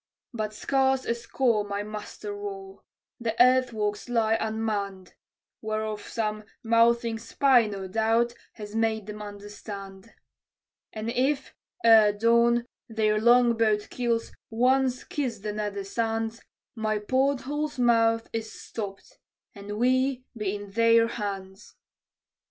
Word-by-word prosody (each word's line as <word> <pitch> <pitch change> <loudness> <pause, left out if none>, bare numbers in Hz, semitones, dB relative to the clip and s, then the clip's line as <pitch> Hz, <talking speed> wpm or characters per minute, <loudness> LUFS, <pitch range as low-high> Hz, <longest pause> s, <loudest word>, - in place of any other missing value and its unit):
"But 215 -2 -3
scarce 265 +1 +1
a - - +1
score 235 -2 0
my 205 0 -3
muster 210 0 -7
roll; 195 -1 -7 0.4
the 230 -1 -3
earthworks 245 -4 +2
lie 225 -2 +2
unmanned 210 -4 -3 0.5
(Whereof 215 -1 -3
some 215 -2 -2 0.2
mouthing 230 0 +3
spy, 245 0 +3
no 195 -2 -5
doubt, 225 +4 +1 0.2
has 210 -1 -9
made 220 -2 0
them 210 0 -7
understand); 205 0 -9 0.8
"And 220 +1 -4
if, 265 +3 0 0.3
ere 220 -2 +7
dawn, 235 +2 +3 0.2
their 215 -1 +1
long 240 0 +5
boat 215 -2 +1
keels 235 -2 -1 0.2
once 255 +2 +2
kiss 290 -10 -3
the 210 +1 -5
nether 205 -1 -3
sands, 225 +2 -2 0.3
My 220 -2 -1
every 210 0 -5
port 265 +3 +2
hole's 295 +2 -3
mouth 230 -2 +3
is 225 -1 -4
stopped, 200 -3 -8 0.3
and 205 +1 -7
we 255 +2 +2
be 210 -3 -2
in 205 -1 -8
their 230 +1 +4
hands!" 195 -3 -6
225 Hz, 125 wpm, -27 LUFS, 210-235 Hz, 0.8 s, ere